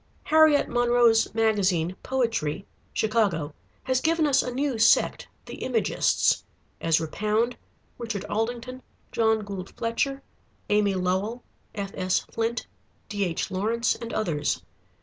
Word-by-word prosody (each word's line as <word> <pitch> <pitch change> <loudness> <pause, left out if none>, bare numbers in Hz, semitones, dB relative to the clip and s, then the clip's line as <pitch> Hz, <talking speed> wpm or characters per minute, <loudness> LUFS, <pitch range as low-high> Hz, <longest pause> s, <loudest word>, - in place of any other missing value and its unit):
Harriet 310 -2 +5
Monroe's 240 -2 +3
magazine, 190 -6 +1
"Poetry" 230 - -1 0.3
(Chicago), 200 -9 0 0.3
has 260 0 0
given 325 0 +2
us 280 -2 +4
a 250 - -4
new 265 -2 -1
sect, 225 - +3 0.2
the - - -9
Imagists: - - +1 0.4
Ezra 165 0 +2
Pound, 215 +7 0 0.4
Richard 225 -5 -4
Aldington, 240 +4 -3 0.3
John 220 -1 +2
Gould 195 -2 -6
Fletcher, 270 +4 -1 0.5
Amy 205 -2 +3
Lowell, 190 +6 -1 0.3
F.S. 195 -2 -1
Flint, 230 +1 -2 0.4
D.H. 195 -5 -2
Lawrence, 225 +5 +1
and 230 -1 -7
others. 150 - -1
225 Hz, 110 wpm, -26 LUFS, 195-245 Hz, 0.5 s, Harriet